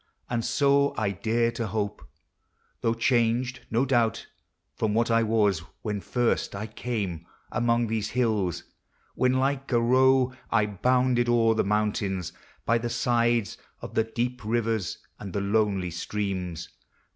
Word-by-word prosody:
And 115 Hz, -1 st, 0 dB
so 140 Hz, +1 st, +2 dB
I 105 Hz, -3 st, 0 dB
dare 115 Hz, +4 st, 0 dB
to 115 Hz, -1 st, -3 dB
hope, 105 Hz, 0 st, -3 dB, 0.8 s
Though 115 Hz, 0 st, +1 dB
changed, 120 Hz, +1 st, +1 dB
no 120 Hz, +4 st, +2 dB
doubt, 120 Hz, -4 st, +1 dB, 0.6 s
iron, 110 Hz, -1 st, +1 dB
what 115 Hz, +1 st, +2 dB
I 115 Hz, 0 st, +4 dB
was 105 Hz, -5 st, +2 dB, 0.2 s
When 105 Hz, -3 st, -2 dB
first 120 Hz, -3 st, 0 dB
I 100 Hz, +2 st, -4 dB
came 105 Hz, -7 st, -4 dB, 0.2 s
among 120 Hz, 0 st, +2 dB
these 110 Hz, -2 st, -2 dB
hills; 110 Hz, -8 st, 0 dB, 0.5 s
when 130 Hz, 0 st, +2 dB
like 135 Hz, +1 st, 0 dB
a 120 Hz, -, +4 dB
roe 130 Hz, +2 st, +4 dB, 0.2 s
I 110 Hz, -2 st, +3 dB
bounded 125 Hz, +4 st, +1 dB
o'er 115 Hz, -1 st, +4 dB
the 110 Hz, -, +1 dB
mountains, 100 Hz, -3 st, -1 dB, 0.3 s
by 115 Hz, +1 st, +3 dB
the 120 Hz, +1 st, -3 dB
sides 120 Hz, -3 st, +1 dB, 0.2 s
Of -, -, -8 dB
the 110 Hz, -, +3 dB
dee!> 120 Hz, +3 st, -2 dB
rivers, 110 Hz, -3 st, -1 dB, 0.2 s
and 100 Hz, -3 st, -7 dB
the 100 Hz, -, -1 dB
lonely 100 Hz, -3 st, +1 dB
streams. 90 Hz, -2 st, -4 dB
115 Hz, 145 wpm, -27 LUFS, 105-120 Hz, 0.8 s, I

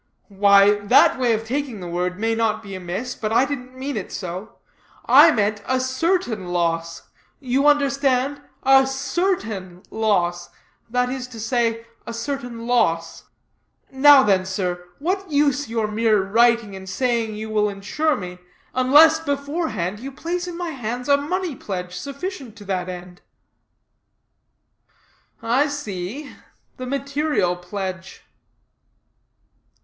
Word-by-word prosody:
"Why, 200 Hz, +1 st, +5 dB
that 205 Hz, +5 st, +4 dB
way 245 Hz, -2 st, +2 dB
of 220 Hz, 0 st, -2 dB
taking 260 Hz, -2 st, -3 dB
the 180 Hz, -, -7 dB
word 180 Hz, +1 st, -2 dB
may 225 Hz, +1 st, +1 dB
not 225 Hz, -1 st, 0 dB
be 200 Hz, -2 st, -9 dB
amiss, 185 Hz, +7 st, -4 dB
but 215 Hz, -1 st, -4 dB
I 235 Hz, +4 st, +4 dB
didn't 255 Hz, -2 st, -6 dB
mean 275 Hz, +2 st, -4 dB
it -, -, -5 dB
so. 185 Hz, +2 st, -6 dB, 0.5 s
I -, -, +8 dB
meant 210 Hz, -1 st, 0 dB
a 260 Hz, 0 st, +1 dB
certain 260 Hz, -, -1 dB
loss; 165 Hz, -1 st, -1 dB, 0.4 s
you 270 Hz, +2 st, +1 dB
understand, 275 Hz, -1 st, +2 dB, 0.2 s
a 270 Hz, 0 st, +6 dB
CERTAIN 225 Hz, -, -2 dB
loss; 175 Hz, -6 st, 0 dB, 0.4 s
that 250 Hz, +1 st, +1 dB
is 255 Hz, -1 st, -4 dB
to 235 Hz, -3 st, -11 dB
say, 230 Hz, 0 st, 0 dB, 0.2 s
a 230 Hz, -, -5 dB
certain 240 Hz, -2 st, -5 dB
loss. 165 Hz, -9 st, 0 dB, 0.7 s
Now 270 Hz, 0 st, +7 dB
then, 190 Hz, -4 st, +3 dB
sir, 180 Hz, -2 st, -3 dB
what 375 Hz, +5 st, -2 dB
use 285 Hz, -3 st, +1 dB
your 225 Hz, -1 st, 0 dB
mere 215 Hz, -1 st, +2 dB
writing 230 Hz, 0 st, +2 dB
and 190 Hz, 0 st, -9 dB
saying 230 Hz, -1 st, -1 dB
you 220 Hz, +1 st, -6 dB
will 210 Hz, -1 st, +2 dB
insure 210 Hz, +11 st, -1 dB
me, 180 Hz, -4 st, -7 dB, 0.3 s
unless 295 Hz, +5 st, +6 dB
beforehand 280 Hz, -, -3 dB
you 270 Hz, +4 st, -7 dB
place 345 Hz, +5 st, -4 dB
in 345 Hz, -1 st, -6 dB
my 350 Hz, -2 st, -3 dB
hands 245 Hz, 0 st, -5 dB
a 280 Hz, -, +7 dB
money 335 Hz, +2 st, -2 dB
pledge, 180 Hz, -5 st, -5 dB
sufficient 280 Hz, -, -6 dB
to 205 Hz, -2 st, -13 dB
that 185 Hz, -2 st, -2 dB
end?" 180 Hz, 0 st, -9 dB, 2.2 s
"I 255 Hz, +6 st, +2 dB
see; 270 Hz, -1 st, -5 dB, 0.5 s
the 255 Hz, -, -6 dB
material 280 Hz, -, 0 dB
pledge." 185 Hz, +1 st, -6 dB
230 Hz, 135 wpm, -22 LUFS, 195-275 Hz, 2.2 s, I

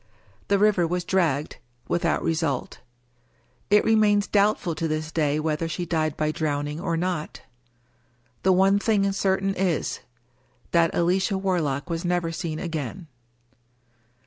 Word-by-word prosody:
The 200 Hz, -, +3 dB
river 195 Hz, -4 st, +3 dB
was 180 Hz, +1 st, -2 dB
dragged 160 Hz, -7 st, 0 dB, 0.2 s
— 120 Hz, 0 st, -39 dB
^without 175 Hz, -, 0 dB
result. 160 Hz, -5 st, -1 dB, 0.9 s
It 210 Hz, 0 st, +4 dB
remains 210 Hz, -2 st, +4 dB
doubtful 200 Hz, -4 st, +1 dB
to 160 Hz, +1 st, -2 dB
this 155 Hz, 0 st, -3 dB
day 150 Hz, -2 st, +1 dB
whether 155 Hz, +1 st, -1 dB
she 175 Hz, +2 st, -3 dB
died 155 Hz, -3 st, -1 dB
by 155 Hz, 0 st, 0 dB
drowning 150 Hz, -1 st, -2 dB
or 170 Hz, -2 st, -1 dB
not. 175 Hz, -2 st, -3 dB, 1.0 s
The 190 Hz, -, +3 dB
one 195 Hz, +2 st, +4 dB
thing 200 Hz, -2 st, +2 dB
certain 195 Hz, 0 st, 0 dB
is 180 Hz, -4 st, -1 dB, 0.4 s
— -, -, -37 dB
^that 170 Hz, -1 st, +4 dB
Alicia 185 Hz, +3 st, +1 dB
Warlock 170 Hz, -8 st, -1 dB
was 165 Hz, +1 st, -3 dB
never 175 Hz, -2 st, 0 dB
seen 160 Hz, -1 st, -4 dB
again. 160 Hz, 0 st, -5 dB
170 Hz, 140 wpm, -25 LUFS, 155-190 Hz, 1.0 s, It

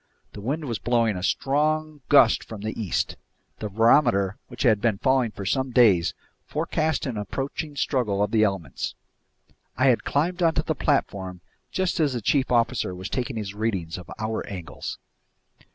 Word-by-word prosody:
The 105 Hz, -, -8 dB
wind 145 Hz, +8 st, -2 dB
was 115 Hz, -6 st, -3 dB
blowing 115 Hz, -3 st, +2 dB
a 90 Hz, -, -4 dB
strong 155 Hz, +7 st, 0 dB
gust 125 Hz, -6 st, +6 dB
from 110 Hz, -3 st, -9 dB
the 110 Hz, +1 st, -3 dB
east. 105 Hz, -7 st, -1 dB, 0.4 s
The 105 Hz, -, -4 dB
barometer, 100 Hz, -3 st, +4 dB
which 120 Hz, -, -5 dB
had 110 Hz, -5 st, +4 dB
been 110 Hz, -3 st, +2 dB
falling 130 Hz, 0 st, +2 dB
for 100 Hz, -2 st, -8 dB
some 130 Hz, +6 st, 0 dB
days, 100 Hz, -9 st, +4 dB, 0.3 s
forecast 155 Hz, -1 st, -1 dB
an 125 Hz, -5 st, -3 dB
approaching 140 Hz, +7 st, -4 dB
struggle 110 Hz, -9 st, 0 dB
of 105 Hz, -, -1 dB
the 110 Hz, -1 st, +4 dB
elements. 95 Hz, -9 st, -2 dB, 0.8 s
I 130 Hz, +2 st, +4 dB
had 120 Hz, -, +2 dB
climbed 175 Hz, +5 st, 0 dB
onto 160 Hz, -2 st, +2 dB
the 160 Hz, -, 0 dB
platform 95 Hz, -, -1 dB, 0.3 s
just 185 Hz, -2 st, 0 dB
as 150 Hz, -4 st, +2 dB
the 120 Hz, -, -3 dB
chief 135 Hz, +5 st, +1 dB
officer 115 Hz, -5 st, +1 dB
was 95 Hz, +1 st, -6 dB
taking 130 Hz, 0 st, -2 dB
his 105 Hz, -3 st, -4 dB
readings 100 Hz, -7 st, -2 dB
of 90 Hz, -, -12 dB
hour 110 Hz, +1 st, -2 dB
angles. 90 Hz, -6 st, -6 dB
115 Hz, 170 wpm, -25 LUFS, 100-140 Hz, 0.8 s, gust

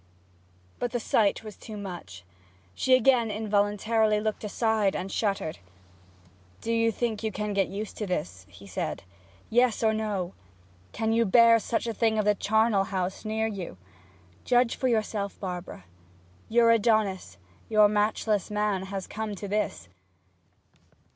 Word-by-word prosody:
But 245 Hz, -, -2 dB
the 240 Hz, -, 0 dB
sight 215 Hz, -2 st, +1 dB
was 215 Hz, -3 st, -9 dB
too 215 Hz, -2 st, -9 dB
much. 175 Hz, -, -8 dB, 0.5 s
She 255 Hz, -, +4 dB
again 250 Hz, -2 st, +3 dB
involuntarily 210 Hz, +1 st, +1 dB
looked 215 Hz, 0 st, -3 dB
aside 215 Hz, -1 st, +1 dB
and 190 Hz, +1 st, -4 dB
shuddered. 195 Hz, -7 st, -1 dB, 1.0 s
'Do 230 Hz, -, -1 dB
you 230 Hz, 0 st, +2 dB
think 225 Hz, -1 st, -2 dB
you 220 Hz, -1 st, -2 dB
can 210 Hz, +1 st, -3 dB
get 195 Hz, -1 st, +2 dB
used 205 Hz, +3 st, -6 dB
to 210 Hz, -, -3 dB
this?' 95 Hz, -, -4 dB
he 95 Hz, +2 st, -14 dB
said. 95 Hz, -, -4 dB, 0.5 s
'Yes 240 Hz, -1 st, +3 dB
or 220 Hz, -1 st, +3 dB
no! 205 Hz, -5 st, -2 dB, 0.6 s
Can 225 Hz, 0 st, -1 dB
you 230 Hz, +1 st, +3 dB
bear 230 Hz, +2 st, +6 dB
such 225 Hz, +1 st, -2 dB
a 230 Hz, -, -2 dB
thing 220 Hz, 0 st, +1 dB
of 215 Hz, -, +1 dB
the 210 Hz, -, +4 dB
charnel 215 Hz, -1 st, +2 dB
house 190 Hz, -2 st, -3 dB
near 220 Hz, +1 st, -1 dB
you? 195 Hz, -, -5 dB, 0.7 s
Judge 245 Hz, -1 st, +3 dB
for 260 Hz, -, -1 dB
yourself; 215 Hz, -4 st, -1 dB
Barbara. 180 Hz, -, -6 dB, 0.7 s
Your 230 Hz, 0 st, +5 dB
Adonis, 215 Hz, -4 st, +1 dB, 0.3 s
your 215 Hz, -1 st, +6 dB
matchless 210 Hz, 0 st, 0 dB
man, 210 Hz, -2 st, -1 dB
has 195 Hz, -1 st, -4 dB
come 215 Hz, -1 st, -5 dB
to 200 Hz, +1 st, -6 dB
this!' 200 Hz, -, -2 dB
215 Hz, 150 wpm, -27 LUFS, 195-225 Hz, 1.0 s, bear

